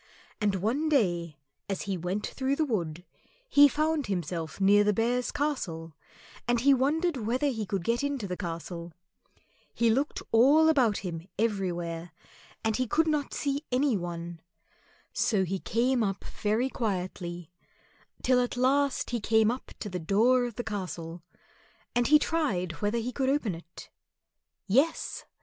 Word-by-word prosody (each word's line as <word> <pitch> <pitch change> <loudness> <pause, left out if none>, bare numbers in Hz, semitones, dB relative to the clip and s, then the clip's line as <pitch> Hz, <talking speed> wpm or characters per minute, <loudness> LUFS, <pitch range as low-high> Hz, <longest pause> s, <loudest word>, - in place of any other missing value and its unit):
And 205 -2 +2
one 240 - 0
day 175 - +1 0.3
as 195 - -2
he 195 -2 -2
went 180 +4 -2
through 270 +1 -1
the 315 - +1
wood 175 - -3 0.4
he 290 -10 +7
found 305 -1 0
himself 170 -3 -3
near 200 +1 +5
the 210 0 +2
Bears' 240 +4 0
Castle, 170 - -3 0.5
and 240 -1 +2
he 280 +2 +6
wondered 300 +5 +1
whether 245 +5 -1
he 220 -6 -3
could 195 -4 -2
get 235 +7 0
into 280 -7 -2
the 180 - -3
castle. 170 -1 -6 0.8
He 235 -1 +3
looked 275 +6 -1
all 285 +8 +6
about 250 -9 +3
him 170 -1 -5
everywhere, 175 -6 -2 0.5
and 220 -1 +1
he 255 -1 0
could 320 +7 +2
not 300 -3 0
see 285 0 -1
any 260 0 +2
one. 170 -2 -5 0.7
So 205 -4 +2
he 190 +1 -2
came 245 +5 +1
up 195 -3 -1
very 220 +5 -1
quietly, 180 - -4 0.7
till 255 -1 +4
at 245 0 -1
last 275 +2 +2
he 240 - 0
came 220 0 +3
up 250 - -6
to - - -3
the 180 -2 -4
door 230 +9 +3
of 240 -3 -6
the 240 - -3
castle, 180 -5 -5 0.7
and 240 -1 +2
he 300 - +7
tried 280 - 0
whether 210 +3 +1
he 235 +2 -2
could 265 0 0
open 270 -8 +1
it. 165 +1 -11 0.7
Yes! 275 +11 +1
220 Hz, 155 wpm, -28 LUFS, 180-265 Hz, 0.8 s, he